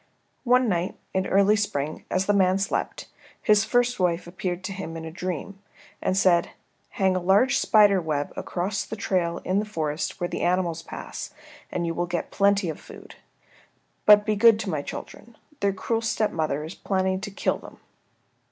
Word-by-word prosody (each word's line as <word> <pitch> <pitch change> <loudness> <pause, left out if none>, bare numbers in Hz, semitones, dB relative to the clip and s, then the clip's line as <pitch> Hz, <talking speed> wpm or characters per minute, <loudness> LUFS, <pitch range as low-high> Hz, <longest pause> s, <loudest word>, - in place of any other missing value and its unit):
One 250 0 +4
night 180 -2 -1 0.2
in 190 - +2
the - - -4
early 200 +2 +4
spring, 155 -8 -2
as 185 +1 0
the 205 - +2
man 190 -1 +3
slept, 195 0 -2 0.3
his 210 -1 +4
first 245 0 +1
wife 175 -1 +1
appeared 180 +1 -4
to 195 - -4
him 175 -4 -6
in 160 - -7
a 160 - -6
dream, 185 +3 -5 0.4
and 185 - 0
said, 180 -3 +3 0.5
"Hang 190 -1 +2
a - - +1
large 195 +8 +3
spider 205 -3 +5
web 150 -3 -2
across 190 +4 -2
the - - -6
trail 180 -5 -1
in 190 +2 +1
the - - 0
forest 160 -7 -3
where 175 - -1
the - - -4
animals 175 -2 0
pass - - -8 0.4
and 175 - -2
you 165 - -1
will 175 +1 -2
get 175 -1 -3
plenty 200 -1 +2
of 160 - -4
food. - - -13 0.9
But 210 0 +8
be 215 - +1
good 225 +1 +6
to 195 -3 -3
my 150 -3 -1
children. 230 +9 -9 0.2
Their 200 -1 +2
cruel 225 +4 -2
stepmother 160 -10 -1
is 160 +3 -7
planning 190 -1 -1
to 195 - -5
kill 200 - -1
them." - - -13
190 Hz, 185 wpm, -25 LUFS, 170-205 Hz, 0.9 s, But